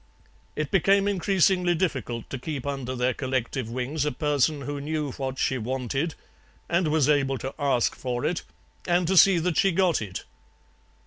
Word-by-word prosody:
It 150 Hz, -1 st, -3 dB
became 195 Hz, +1 st, +3 dB
increasingly 185 Hz, -2 st, +2 dB
difficult 135 Hz, -, -2 dB
to 130 Hz, -, -4 dB
keep 140 Hz, -1 st, -5 dB
under 135 Hz, -2 st, -3 dB
their 125 Hz, 0 st, +1 dB
collective 130 Hz, -2 st, -2 dB
wings 130 Hz, +5 st, -2 dB
a 150 Hz, -, 0 dB
person 150 Hz, 0 st, +1 dB
who 145 Hz, +1 st, -4 dB
knew 150 Hz, -1 st, -2 dB
what 130 Hz, 0 st, -4 dB
she 130 Hz, 0 st, 0 dB
wanted 130 Hz, +6 st, -2 dB, 0.5 s
and 170 Hz, 0 st, +1 dB
was 150 Hz, -2 st, +2 dB
able 140 Hz, -3 st, +2 dB
to 135 Hz, +1 st, -5 dB
ask 135 Hz, -5 st, +2 dB
for 125 Hz, -1 st, -3 dB
it 170 Hz, +1 st, 0 dB, 0.5 s
and 175 Hz, 0 st, +2 dB
to 190 Hz, +3 st, +1 dB
see 190 Hz, 0 st, +7 dB
that 170 Hz, -1 st, 0 dB
she 195 Hz, -, +4 dB
got 180 Hz, -4 st, +2 dB
it. 95 Hz, -3 st, -6 dB
145 Hz, 170 wpm, -26 LUFS, 130-170 Hz, 0.5 s, see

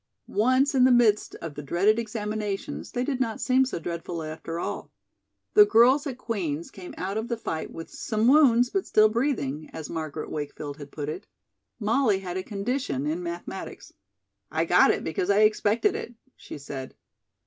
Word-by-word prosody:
Once 255 Hz, +7 st, +2 dB
in 260 Hz, -2 st, +4 dB
the 260 Hz, -, +6 dB
midst 225 Hz, -4 st, +3 dB
of 165 Hz, -3 st, -5 dB
the 150 Hz, -, -7 dB
dreaded 195 Hz, +10 st, +2 dB
examinations 210 Hz, -2 st, -4 dB
they 245 Hz, -, 0 dB
did 265 Hz, -1 st, -2 dB
not 230 Hz, -4 st, -1 dB
seem 260 Hz, 0 st, +3 dB
so 260 Hz, -, -4 dB
dreadful 170 Hz, 0 st, -5 dB
after 160 Hz, +1 st, -6 dB
all. -, -, -4 dB, 0.6 s
The 420 Hz, -, +9 dB
girls 275 Hz, -, +4 dB
at 260 Hz, -3 st, -5 dB
Queen's 170 Hz, -, -3 dB
came 180 Hz, -2 st, -10 dB
out 195 Hz, +4 st, -2 dB
of 220 Hz, -, -4 dB
the 235 Hz, -, -2 dB
fight 160 Hz, -7 st, -4 dB
with 165 Hz, -, -9 dB
"some 220 Hz, 0 st, -1 dB
wounds, 250 Hz, -4 st, +5 dB
but 390 Hz, -, -1 dB
still 215 Hz, 0 st, +5 dB
breathing," 215 Hz, -, -1 dB
as 160 Hz, -2 st, -7 dB
Margaret 155 Hz, -2 st, -5 dB
Wakefield 145 Hz, -1 st, -5 dB
had 145 Hz, -2 st, -10 dB
put 145 Hz, -2 st, -5 dB
it. 155 Hz, -, -6 dB, 0.5 s
Molly 220 Hz, -1 st, +2 dB
had 185 Hz, -2 st, -6 dB
a 185 Hz, -, -1 dB
condition 200 Hz, -, -2 dB
in 160 Hz, +4 st, -1 dB
mathematics. 170 Hz, 0 st, -7 dB, 0.6 s
"I 160 Hz, +1 st, 0 dB
got 180 Hz, +2 st, +5 dB
it -, -, +1 dB
because 160 Hz, +4 st, -2 dB
I 200 Hz, +1 st, +4 dB
expected 215 Hz, -, +3 dB
it," 240 Hz, -, -6 dB, 0.2 s
she -, -, -9 dB
said. 135 Hz, -2 st, -7 dB
210 Hz, 180 wpm, -26 LUFS, 165-240 Hz, 0.6 s, The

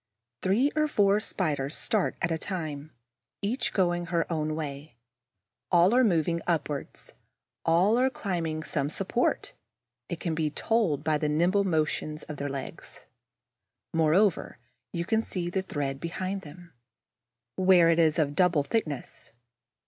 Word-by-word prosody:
Three 230 Hz, +10 st, +2 dB
or 305 Hz, 0 st, +2 dB
four 205 Hz, -7 st, +3 dB
Spiders 150 Hz, -9 st, -2 dB
start 215 Hz, -4 st, 0 dB
at 165 Hz, -, +1 dB
a 165 Hz, -, +1 dB
time, 155 Hz, -5 st, -4 dB, 0.5 s
each 235 Hz, +3 st, 0 dB
going 175 Hz, -2 st, +1 dB
her 170 Hz, -1 st, +1 dB
own 155 Hz, -1 st, -1 dB
way. 145 Hz, -3 st, -6 dB, 0.8 s
All 175 Hz, +3 st, +5 dB
are 255 Hz, +1 st, +5 dB
moving 170 Hz, -5 st, +2 dB
upwards, 150 Hz, -4 st, -2 dB, 0.5 s
all 185 Hz, +8 st, +4 dB
are 260 Hz, +1 st, +4 dB
climbing 165 Hz, -9 st, -3 dB
some 145 Hz, -2 st, -1 dB
support, -, -, -1 dB, 0.6 s
as 170 Hz, -, -3 dB
can 165 Hz, -1 st, -2 dB
be 155 Hz, -1 st, 0 dB
told 170 Hz, -5 st, 0 dB
by 155 Hz, -1 st, +1 dB
the 150 Hz, -, 0 dB
nimble 180 Hz, +6 st, +2 dB
motion 155 Hz, -3 st, 0 dB
of 150 Hz, -, -6 dB
their 140 Hz, +1 st, -3 dB
legs. 135 Hz, -1 st, -7 dB, 0.9 s
Moreover, 165 Hz, +4 st, +2 dB, 0.3 s
you 170 Hz, -1 st, -3 dB
can 220 Hz, +4 st, +2 dB
see 175 Hz, -5 st, -3 dB
the 190 Hz, -, 0 dB
thread 140 Hz, -7 st, -3 dB
behind 185 Hz, +4 st, -3 dB
them, 170 Hz, +1 st, -13 dB, 0.8 s
where 185 Hz, -3 st, +5 dB
it 165 Hz, -, +2 dB
is 160 Hz, -1 st, +3 dB
of 145 Hz, -3 st, +1 dB
double 175 Hz, -3 st, +3 dB
thickness. 150 Hz, -, -3 dB
170 Hz, 140 wpm, -28 LUFS, 155-190 Hz, 0.9 s, All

